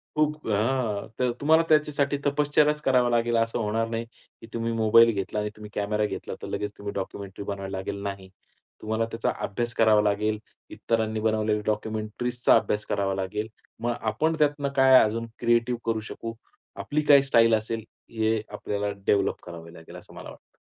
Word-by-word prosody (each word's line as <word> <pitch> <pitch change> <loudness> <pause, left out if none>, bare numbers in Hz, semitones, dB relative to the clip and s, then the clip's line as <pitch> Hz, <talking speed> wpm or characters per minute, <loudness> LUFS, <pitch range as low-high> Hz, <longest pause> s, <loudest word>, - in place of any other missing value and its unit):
खूप 150 0 0
अ, - - 0
हां. 110 -2 0
तर 125 -1 +2
तुम्हाला 160 +3 +5
त्याच्यासाठी 145 -2 +2
तपश्चर्याच 150 +1 +2
करावा 125 -4 +3
लागेल. 120 0 +1
असं 115 +1 0
होणार 115 +1 0
नाही, 115 0 -3
की 115 -1 -19
तुम्ही 115 0 -2
मोबाईल 115 +1 +5
घेतला 100 +1 -3
आणि 105 0 -2
तुम्ही 105 0 -10
कॅमेरा 105 +1 0
घेतला, - - -5
तर - - -6
लगेच 105 0 -3
तुम्ही 100 0 -6
डॉक्युमेंटरी 100 0 -6
बनवाया 100 -1 -5
लागेल, 95 +1 -4
नाही. 100 -1 -6 0.5
तुम्हाला 110 +1 -1
त्याचा 115 - -1
अभ्यास 120 +3 -3
करावा 110 -2 +5
लागेल. 105 +1 0 0.3
इतरांनी 110 -1 -1
बनवलेले 110 -1 +1
डॉक्युमेंटरीजचा 110 +3 0
अभ्यास 105 -2 0
करावा 100 -1 -1
लागेल. 100 +3 -3 0.3
मग 120 +1 0
आपण 110 +10 0
त्यातनं 145 -1 +1
काय 130 -1 +7
अजून 115 +2 -1
क्रिएटिव्ह 120 0 +1
करू 115 -1 0
शकू, 115 0 -6 0.4
आपली 150 +1 -2
काय 140 -1 +8
स्टाईल 115 -1 +5
असेल, 110 +1 -3 0.3
हे 110 -1 0
आपल्याला 105 0 -3
डेव्हलप 100 - +1
करावं 85 -1 -10
लागेल, 80 -1 -13
असं - - -13
मला - - -9
वाटतं. - - -17
110 Hz, 170 wpm, -26 LUFS, 105-120 Hz, 0.5 s, काय